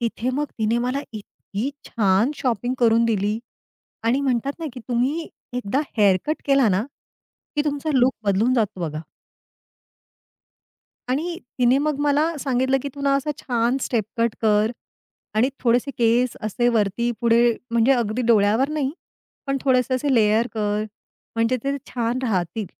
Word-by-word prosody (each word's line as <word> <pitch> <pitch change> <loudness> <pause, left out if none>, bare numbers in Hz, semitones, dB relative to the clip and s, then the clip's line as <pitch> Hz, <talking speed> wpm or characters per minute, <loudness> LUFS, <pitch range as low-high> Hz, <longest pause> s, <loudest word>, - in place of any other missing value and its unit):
तिथे 235 +1 -1
मग 290 +3 0
तिने 220 +2 +1
मला 255 +3 -1
इतकी 215 +3 -5 0.2
छान 205 +2 +2
शॉपिंग 245 -1 -1
करून 230 -1 +4
दिली 210 -1 0 0.7
आणि 245 +5 +2
म्हणतात 265 0 0
ना, 330 - -4
की 250 - -9
तुम्ही 265 +7 0 0.3
एकदा 250 0 -1 0.2
हेअरकट 205 - +3
केला 275 -4 +4
ना, 190 +1 +2 0.7
की 295 - +3
तुमचा 295 +1 -2
लूक 260 0 +4
बदलून 205 +6 +2
जातो 215 -6 0
बघा. 155 -2 -3 2.1
आणि 330 +7 -1 0.2
तिने 245 +2 +4
मग 290 0 -1
मला 295 +3 +2
सांगितलं 260 -1 +1
की 280 - -4
तुला 280 0 0
असा 275 +2 -1
छान 240 0 0
स्टेप 235 -4 0
कट 230 -1 +1
कर 215 0 +3 0.6
आणि 245 +5 +3
थोडेसे 245 +3 +2
केस 235 +1 +2
असे 230 +3 0
वरती 230 +1 +1
पुढे, 235 0 +4 0.2
म्हणजे 235 +3 +4
अगदी 235 -1 0
डोळ्यावर 220 +4 +4
नाही, 295 -3 -1 0.6
पण 275 0 0
थोडेसे 255 -2 +2
असे 270 +2 +1
लेयर 220 +1 +3
कर. 210 -1 -1 0.5
म्हणजे 230 +3 +1
ते 275 +1 0
छान 240 0 -1
राहतील. 205 -2 -1
240 Hz, 145 wpm, -23 LUFS, 220-270 Hz, 2.1 s, करून